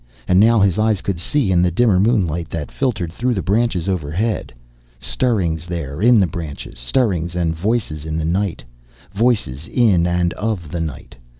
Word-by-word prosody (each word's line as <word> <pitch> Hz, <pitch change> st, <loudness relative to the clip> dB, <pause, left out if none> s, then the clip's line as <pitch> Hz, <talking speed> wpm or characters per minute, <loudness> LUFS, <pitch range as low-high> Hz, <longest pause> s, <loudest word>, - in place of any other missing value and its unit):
And 90 Hz, 0 st, +4 dB
now 115 Hz, +2 st, +5 dB
his 100 Hz, -1 st, +2 dB
eyes 110 Hz, -3 st, +2 dB
could 95 Hz, -4 st, -3 dB
see 120 Hz, -, 0 dB
in 90 Hz, -1 st, +4 dB
the 90 Hz, -, +3 dB
dimmer 95 Hz, +1 st, +3 dB
moonlight 90 Hz, -7 st, +1 dB
that 80 Hz, -3 st, -5 dB
filtered 105 Hz, -11 st, -2 dB
through 125 Hz, +4 st, 0 dB
the 95 Hz, -, -2 dB
branches 100 Hz, -4 st, 0 dB
overhead. 95 Hz, -, -2 dB, 0.5 s
Stirrings 80 Hz, -, -1 dB
there, 85 Hz, -3 st, -5 dB
in 120 Hz, 0 st, +6 dB
the 95 Hz, -, +4 dB
branches. 75 Hz, -7 st, -7 dB
Stirrings 85 Hz, -, 0 dB
and 85 Hz, -2 st, 0 dB
voices 95 Hz, -4 st, -1 dB
in 80 Hz, 0 st, -3 dB
the 80 Hz, -, -1 dB
night. 95 Hz, +2 st, -1 dB, 0.5 s
Voices 100 Hz, -, 0 dB
in 100 Hz, -9 st, +3 dB
and 85 Hz, 0 st, +1 dB
of 105 Hz, -8 st, -3 dB
the 85 Hz, -, -3 dB
night. 80 Hz, -5 st, -6 dB
90 Hz, 175 wpm, -19 LUFS, 80-110 Hz, 0.5 s, in